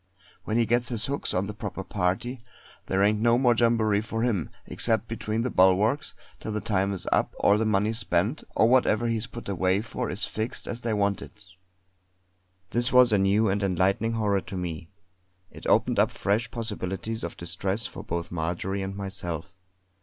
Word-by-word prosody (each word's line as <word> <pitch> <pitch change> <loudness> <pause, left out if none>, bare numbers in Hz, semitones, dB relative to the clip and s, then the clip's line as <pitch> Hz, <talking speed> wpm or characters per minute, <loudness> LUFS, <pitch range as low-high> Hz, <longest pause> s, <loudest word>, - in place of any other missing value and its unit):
When 110 - 0
he 120 - +3
gets 120 +2 +1
his 115 -3 -3
hooks 140 +1 -2
on 90 +2 0
the 105 - -5
proper 100 -2 -5
party, 115 +7 -2 0.4
there 95 +1 +2
ain't 105 +1 +3
no 120 +1 +4
more 125 -1 +4
jamboree 110 -3 +2
for 115 +1 -3
him, 105 -10 0 0.2
except 115 -1 +1
between 110 0 -2
the 125 - -1
bulwarks, 100 +10 +3 0.2
till 110 - -5
the 105 - -1
time 100 -2 0
is 95 - -3
up, - - +1
or 100 - +5
the 110 - +1
money 105 +1 +2
spent, 105 - 0
or 110 - +5
whatever 120 -2 +3
he 115 -1 +1
is 110 +3 -3
put 120 -1 -9
away 95 0 +1
for 110 - -4
is - - -1
fixed 110 +3 -4
as 120 - -3
they 115 -2 -1
want 100 -1 +1
it." 105 0 -12 1.3
This 120 +2 0
was 125 -2 +7
a 105 - +4
new 100 +3 +3
and 100 +1 0
enlightening 100 +4 +1
horror 105 -3 +1
to 95 - -7
me. 85 -2 -5 0.6
It - - -9
opened - - +3
up - - +4
fresh 110 +5 -1
possibilities 110 -2 -3
of 85 - -5
distress 95 +5 -2
for - - -7
both 85 +1 -4
Marjory 90 +4 -2
and 95 0 -4
myself. 95 -2 -5
105 Hz, 190 wpm, -26 LUFS, 95-115 Hz, 1.3 s, was